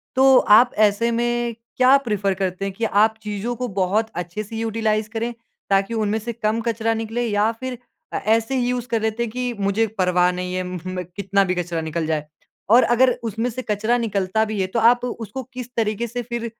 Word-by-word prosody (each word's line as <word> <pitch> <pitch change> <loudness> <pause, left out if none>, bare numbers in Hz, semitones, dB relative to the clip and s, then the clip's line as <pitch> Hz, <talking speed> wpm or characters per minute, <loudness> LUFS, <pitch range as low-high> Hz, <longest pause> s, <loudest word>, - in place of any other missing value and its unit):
तो 265 0 +6 0.2
आप 245 - +5 0.2
ऐसे 230 +4 0
में 240 0 -1 0.2
क्या 255 +1 +6
प्रेफ़र 210 -7 -1
करते 190 0 -2
हैं 195 - -3
कि 230 - -6
आप 220 +1 +3
चीज़ों 210 +3 -3
को 250 +1 -3
बहुत 210 +5 +1
अच्छे 175 +4 -4
से 220 +2 -9
यूटिलाइज़ 220 -1 -1
करें 230 +1 -3 0.4
ताकि 195 +3 +2
उनमें 220 -1 0
से 235 +2 -5
कम 220 0 -1
कचरा 225 -1 0
निकले 225 +2 -2
या 210 +1 +2
फ़िर 255 -1 -5 0.4
अ, - - 0
ऐसे 225 +4 +1
ही 245 -1 +1
यूज़ 245 -1 -2
कर 230 -2 0
लेते 220 +1 -1
हैं 230 - -4
कि 250 0 -2
मुझे 200 +3 +1
परवाह 180 -1 +3
नहीं 180 0 -4
है 185 - -1
म 180 0 -5 0.2
अ, 180 - -1
कितना 200 0 +1
भी 185 -1 -1
कचरा 175 -2 -2
निकल 160 +1 -3
जाए? 155 -2 -1 0.4
और 240 +3 +7
अगर 250 +2 +4
उसमें 225 +2 -2
से 255 +2 -5
कचरा 215 +4 +1
निकलता 210 -2 0
भी 215 -1 -4
है 190 - +1
तो 230 - -1
आप 240 +2 +4
उसको 235 +1 -5
किस 250 -1 -6
तरीक़े 220 +1 0
से 245 +2 -4
फ़िर 235 0 -4
220 Hz, 215 wpm, -22 LUFS, 195-235 Hz, 0.4 s, और